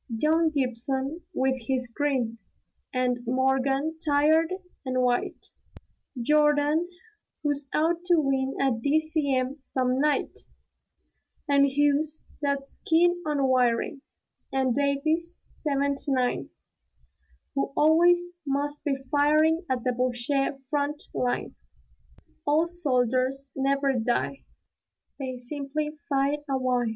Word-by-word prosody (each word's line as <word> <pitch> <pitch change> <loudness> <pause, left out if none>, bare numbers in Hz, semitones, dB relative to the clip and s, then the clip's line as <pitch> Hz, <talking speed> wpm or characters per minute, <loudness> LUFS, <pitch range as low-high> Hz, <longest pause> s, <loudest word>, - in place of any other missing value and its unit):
Young 310 +8 +2
Gibson 270 +2 -1
with 265 -5 0
his 260 -2 0
grin; 240 -3 -1 0.5
and 250 -1 0
Morgan, 270 +4 +1
tired 310 +3 +3 0.3
and 255 -1 0
white; 245 -1 -1 0.7
Jordan, 300 +4 +3 0.5
who's 290 -2 0
out 325 +2 +2
to 355 -1 +4
win 270 -3 +1
a 275 -1 +3
D.C.M. 280 +1 0
some 255 -1 -1
night: 295 +1 0 1.1
And 280 0 +5
Hughes 290 +2 +1 0.2
that's 280 -1 -2
keen 350 +2 +3
on 290 -2 +1
wiring; 255 +2 +1 0.5
and 265 -2 +1
Davies 310 +5 0 0.2
('79), 280 -3 0 1.0
Who 275 - -1
always 350 +3 +4
must 290 +1 -2
be 285 -2 +1 0.2
firing 310 +3 +3
at 255 -2 -1
the 250 - +1
Boche 245 +1 -1 0.4
front 295 0 -1
line. 245 -1 -1 0.9
"Old 320 +4 +2
soldiers 260 -3 0
never 275 0 +1
die; 245 +3 -1 0.7
they 260 -2 -4
simply 290 +4 -4
fide 280 +1 +1
a 270 - +1
why!" 250 -2 +1
280 Hz, 105 wpm, -27 LUFS, 260-300 Hz, 1.1 s, And